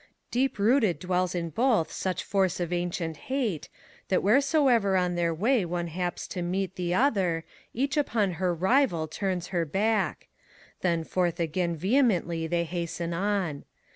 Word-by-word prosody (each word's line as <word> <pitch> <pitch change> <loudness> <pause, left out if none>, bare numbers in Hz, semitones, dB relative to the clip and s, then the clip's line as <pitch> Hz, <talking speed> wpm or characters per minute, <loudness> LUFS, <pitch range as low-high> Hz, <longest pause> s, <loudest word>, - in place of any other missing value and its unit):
Deep 260 +1 +1
rooted 215 -3 +3
dwells 180 0 -1
in 170 -2 -2
both 230 -7 +2
such 185 -1 -2
force 195 -4 0
of 175 0 -2
ancient 175 -2 -2
hate, 240 - -1 0.4
That 185 - +1
wheresoever 245 - +3
on 180 -1 +1
their 170 -1 +1
way 215 +7 +2
one 175 0 -3
haps 175 +2 -3
to 180 - -4
meet 185 +1 -2
The 175 -1 -1
other, 190 - +1 0.3
each 275 +5 -1
upon 225 -9 +1
her 180 -1 +2
rival 180 - +2
turns 180 +2 -3
her 175 -3 0
back: 205 +6 0 0.5
Then 170 -3 +1
forth 175 0 -1
again 170 +1 -1
vehemently 180 - +1
they 170 +1 0
hasten 170 0 -3
on. 185 -5 -1
180 Hz, 150 wpm, -27 LUFS, 170-215 Hz, 0.5 s, rooted